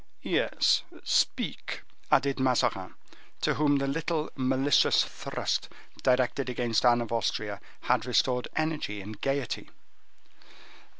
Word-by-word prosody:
"Yes, - - +2 0.2
speak," - - 0 0.3
added 140 0 +3
Mazarin, 130 -2 +1 0.5
to - - +2
whom 145 -1 +2
the 140 0 +1
little 155 +2 -2
malicious 130 +1 +3
thrust - - -3 0.3
directed 130 0 +1
against 120 -2 0
Anne 120 -1 +5
of 115 - -5
Austria 105 -3 -1 0.2
had 125 -1 +1
restored 125 0 +1
energy 155 -10 -2
and 105 +1 -9
gayety. 135 -3 -2
130 Hz, 110 wpm, -28 LUFS, 120-140 Hz, 0.5 s, Anne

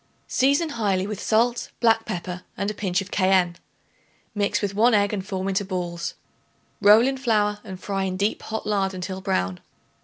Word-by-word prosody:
Season 280 +5 +2
highly 200 -8 0
with 205 -1 -5
salt, 235 +2 +1
black 225 -1 +3
pepper 180 0 -5 0.2
and 200 +1 -1
a - - -6
pinch 190 -3 -1
of 195 - -9
cayenne. 185 -2 +3 0.8
Mix 205 -1 0
with 200 -2 -2
1 225 +3 +4
egg 205 0 +2
and 195 -2 -2
form 190 -1 -3
into 195 +1 0
balls; 175 -3 -4 0.7
roll 210 +3 +7
in 270 0 -1
flour 210 -5 +1
and 190 -4 -8
fry 195 0 -2
in 185 -1 -2
deep 205 +3 0
hot 220 0 -5
lard 195 -2 0
until 185 +1 -5
brown. 95 - -1
200 Hz, 180 wpm, -24 LUFS, 185-215 Hz, 0.8 s, roll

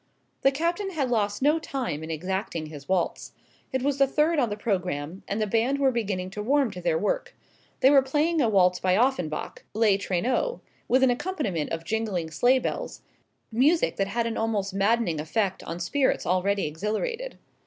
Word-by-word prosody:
The 270 - +5
Captain 340 +7 -1
had 275 -6 -1
lost 205 0 0
no 300 +3 +4
time 250 - -4
in 160 - -7
exacting 175 0 -3
his 145 -2 -10
waltz. 185 -2 -1 0.4
It 260 -1 -1
was 280 0 0
the 275 - +5
third 305 +3 +2
on 245 -4 +2
the 205 - -4
programme, 180 -5 -2
and 200 - -2
the 215 - +1
band 230 +6 +1
were 275 -1 +3
beginning 195 -6 -2
to 210 - -5
warm 270 +1 +2
to 180 - -8
their 170 -2 +1
work. 210 - -2 0.5
They 265 - +6
were 280 -2 +7
playing 300 +4 +1
a 235 - +3
waltz 180 -3 +3
by 185 0 +2
Offenbach 225 - -1
"Les 215 -3 +4
Traîneaux" 245 - -1 0.3
with 260 +1 +3
an 260 - +5
accompaniment 240 - -2
of 165 0 -4
jingling 195 -6 -2
sleigh 245 +11 +4
bells 255 - -4 0.5
music 285 +9 +2
that 195 - +1
had 230 +3 -1
an 230 -1 -2
almost 210 -4 -1
maddening 200 -4 +1
effect 190 +4 -1
on 170 - -5
spirits 260 +10 +1
already 195 +2 +1
exhilarated. 220 - -3
220 Hz, 185 wpm, -26 LUFS, 185-270 Hz, 0.5 s, were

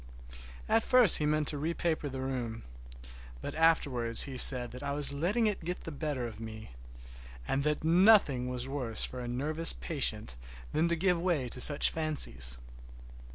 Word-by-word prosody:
At 225 +1 +2
first 245 -5 +5
he 150 - -1
meant 150 0 0
to 150 - -4
repaper 160 -1 -3
the 130 0 -6
room, 125 -4 -5 0.8
but - - -7
afterwards 135 -8 +1
he 135 - -7
said 125 -1 +6
that 125 - -10
I 140 0 -4
was 145 -1 +1
letting 185 +11 0
it 210 -5 -2
get 180 +2 -5
the 165 - -7
better 145 -4 -4
of 110 -2 -9
me, 110 - -9 0.8
and 135 +1 -1
that 150 0 -1
nothing 165 - +3
was 125 0 -4
worse 130 -5 -2
for 125 - -6
a 120 - -6
nervous 150 +7 -1
patient - - -3 0.4
than 160 +2 +1
to 170 - 0
give 175 0 0
way 170 -8 -1
to 125 - -5
such 145 +2 +3
fancies. 65 - -1
145 Hz, 170 wpm, -30 LUFS, 125-165 Hz, 0.8 s, said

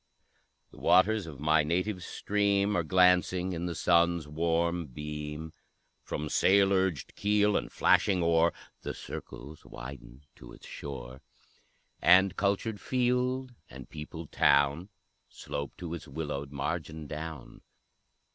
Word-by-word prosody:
The - - -15
waters 95 +2 +3
of 70 -4 -9
my 75 +1 +3
native 90 +4 -1
stream 100 +1 0
Are 85 - +2
glancing 90 +1 +3
in 85 +1 -3
the 85 - -4
sun's 85 -2 +2
warm 85 +2 0
beam; 75 +3 -6 0.5
From 75 - -4
sail 100 +5 +4
urged 95 -7 0
keel 105 0 +2
and - - -2
flashing 95 -3 +3
oar 85 0 +3 0.3
The - - -5
circles 75 +3 -9
widen 65 0 -10
to - - -12
its - - -14
shore; 65 -2 -8 0.8
And 95 +2 +5
cultured 100 +2 -1
field 125 0 0 0.2
and 65 -1 -11
peopled 80 +1 -8
town 70 +6 +3 0.4
Slope 70 -1 -6
to 85 -2 -6
its 85 - -7
willowed 70 -1 -5
margin 80 +2 -4
down. 75 -2 -8
85 Hz, 125 wpm, -29 LUFS, 75-95 Hz, 0.8 s, And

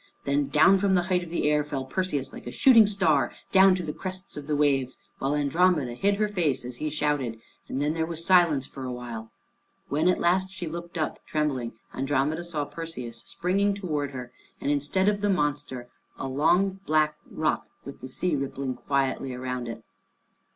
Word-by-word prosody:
Then 140 0 +1
down 155 +7 +5
from 195 -1 +3
the 175 - +3
height 180 - +3
of 175 - -8
the 165 -3 0
air 150 0 +3
fell 140 -3 -4
Perseus 145 -3 -2
like - - -9
a - - -4
shooting 230 - +7
star, 160 -11 +2 0.2
down 190 -1 +7
to 180 - -3
the 150 -2 -4
crests 185 0 -7
of 145 -1 -7
the 150 - +1
waves, 135 -3 +1 0.2
while 135 +2 0
Andromeda 150 -2 +2
hid 200 +11 +1
her 210 +1 +1
face 170 -11 0
as 125 0 -6
he 155 - -2
shouted, 145 -6 -1 0.3
and 130 - -3
then 150 +2 +1
there 160 0 -1
was 165 0 -3
silence 170 -7 +4
for 135 - -9
a 130 - -3
while. 120 -3 -6 0.6
When 155 +4 +1
at 180 - +3
last 185 +2 +2
she 190 -2 -6
looked 170 +1 -6
up 155 -2 -2
trembling, 140 -6 -1 0.2
Andromeda 145 +4 0
saw 160 -4 -3
Perseus 125 -9 -7
springing 200 +3 +1
towards 150 -8 -3
her, 125 -2 -7 0.3
and 140 - 0
instead 145 +7 +1
of 205 -1 +2
the 205 - +1
monster, 145 -7 -1 0.3
a - - -4
long 175 +8 +2
black 155 0 +3
rock, - - -1 0.2
with - - -9
the 130 - -7
sea 180 +2 0
rippling 135 -1 -3
quietly 135 0 -1
round 125 -1 -4
it. 115 -1 -7
150 Hz, 195 wpm, -27 LUFS, 135-180 Hz, 0.6 s, shooting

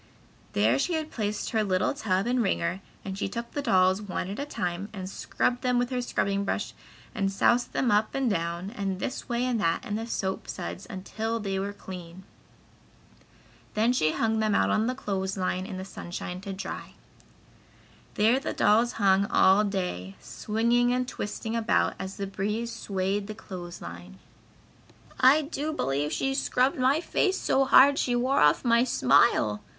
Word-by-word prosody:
There 110 +6 +3
she 355 - 0
had 315 -1 -2
placed 210 -2 -3
her 220 -2 +2
little 185 -2 +1
tub 200 -9 0
and 245 +1 +1
wringer 190 -2 -1 0.2
and 190 -1 -4
she 195 - -2
took 235 +3 -5
the 290 - -3
dolls 190 -5 +3
one 190 -2 -4
at 205 - -6
a 285 - -3
time, 180 -5 -3
and 190 -3 -6
scrubbed 245 +5 -1
them 250 -1 +1
with 245 +1 0
a 250 -1 -1
scrubbing 200 -4 -1
brush 200 - -2 0.4
and 195 -1 0
soused 240 +5 +2
them 250 -4 +1
up 210 +1 +2
and 270 -1 +1
down 170 -1 -2
and 195 -5 -3
this 260 - -4
way 240 +1 0
and 245 -4 0
that 165 -3 0
in 205 - -4
the 225 +2 -3
soap 190 -4 -3
suds 190 - -6
until 220 +3 -3
they 195 -2 -2
were 200 +1 -2
clean. 185 -2 -10 1.5
Then 225 +3 +3
she 155 -11 +2
hung 220 -1 0
them 215 -2 +1
all - - +4
out - - 0
on 215 +1 +2
the 255 - -1
clothes 195 -6 -3
line 185 0 -1
in 190 -4 -6
the 190 - -6
sunshine 180 -1 -6
to 195 - -6
dry. 190 - -6 1.2
There 225 +5 +4
the - - -4
dolls 230 +3 +3
hung 200 -1 +3
all 195 +1 +5
day, 180 - -3
swinging 235 +3 +1
and 250 0 0
twisting 220 -1 -4
about 230 0 +2
as 190 0 -6
the 200 - -3
breeze 210 +4 -3
swayed 200 -2 -2
the 215 - -6
clothes 175 -4 -8
line. 90 +2 -9 1.0
"I 275 +4 +6
do 300 +1 -3
believe 145 - -1
she 270 - 0
scrubbed 265 -1 +1
my 270 +5 +3
face 380 +2 +1
so 270 -6 +2
hard 275 +1 +6
she 245 - +1
wore 255 +3 +2
off 150 - +4
my 235 0 +4
smile!" 125 - +3
205 Hz, 180 wpm, -27 LUFS, 190-245 Hz, 1.5 s, I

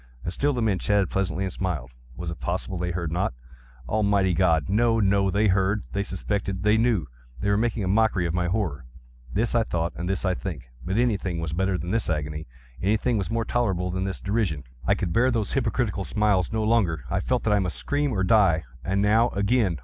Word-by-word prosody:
And 85 - -3
still 145 +8 +1
the 125 -4 -1
men 100 -4 +1
chatted 100 -3 +1
pleasantly, 95 -1 -1
and 95 -2 -3
smiled. 75 -10 -3 0.3
Was 85 -1 -4
it 85 - -8
possible 95 +2 -3
they 90 0 -1
heard 85 -2 -3
not? 90 -5 -1 0.5
Almighty 100 - +2
God!—no, 95 +7 +2
no! 100 -1 +3
They 100 +3 +2
heard!—they 100 +1 +1
suspected!—they 100 +1 -1
knew!—they 65 - -1
were - - +3
making 115 0 0
a - - -1
mockery 100 -2 +2
of 85 - -1
my 90 0 0
horror!—this 70 - -3
I 120 - +4
thought, 85 -6 -1
and 90 +1 -4
this 95 +1 -1
I 95 - +2
think. 85 -8 -5 0.2
But 95 +4 -2
anything 100 -8 0
was 85 -1 -3
better 95 +2 +1
than 85 +2 -4
this 115 -3 0
agony! 75 0 -3 0.3
Anything 110 +4 +1
was 95 - -3
more 115 0 -1
tolerable 95 -8 0
than 95 +1 -2
this 95 -1 -4
derision! 100 - -1 0.2
I - - +4
could 85 - -2
bear 125 +5 +4
those 115 -5 -1
hypocritical 120 -7 0
smiles 105 -3 +1
no 110 -1 0
longer! 100 - +2
I - - +1
felt - - 0
that 105 - +2
I 105 - +4
must 90 -3 -2
scream 145 0 0
or 95 -5 0
die! 95 -5 +4 0.2
and 95 +5 0
now—again! 105 -2 +2
95 Hz, 200 wpm, -25 LUFS, 85-110 Hz, 0.5 s, I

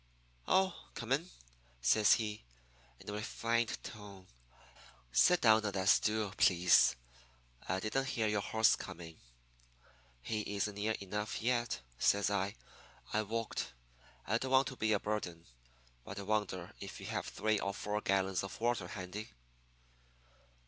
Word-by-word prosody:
"'Oh, 190 -1 +3 0.2
come 115 +1 -6
in,' 155 +7 +1 0.5
says 100 - +5
he, 105 -2 -1 0.6
in - - -16
a 105 - -4
refined 115 +2 -1
tone. 100 -3 -10 0.9
'Sit 180 - +5
down 110 -1 +6
on 100 - -1
that 95 0 +1
stool, 105 -1 +3
please. 90 -7 +5 0.7
I 95 +1 +1
didn't 135 +7 -1
hear 115 -4 0
your 105 -1 +1
horse 110 +2 +3
coming.' 80 -1 -9 1.0
"'He 105 -2 -3
isn't 100 +1 -1
near 105 +2 -1
enough 105 +2 -3
yet,' 120 - 0 0.2
says 100 0 +3
I. 100 +1 0 0.6
'I 110 - +3
walked. 115 +1 -3 0.5
I 115 +3 +1
don't 130 - -3
want 130 0 +4
to 130 - -8
be 110 -3 0
a 105 - +3
burden, 90 -6 -3 0.6
but 95 - -8
I 100 - -4
wonder 100 -4 -2
if - - -8
you - - -8
have - - -3
three 110 +1 0
or 100 - -1
four 105 +1 -2
gallons 95 -1 +1
of 95 - -7
water 115 -5 0
handy.' 95 +3 -6
105 Hz, 145 wpm, -34 LUFS, 100-110 Hz, 1.0 s, down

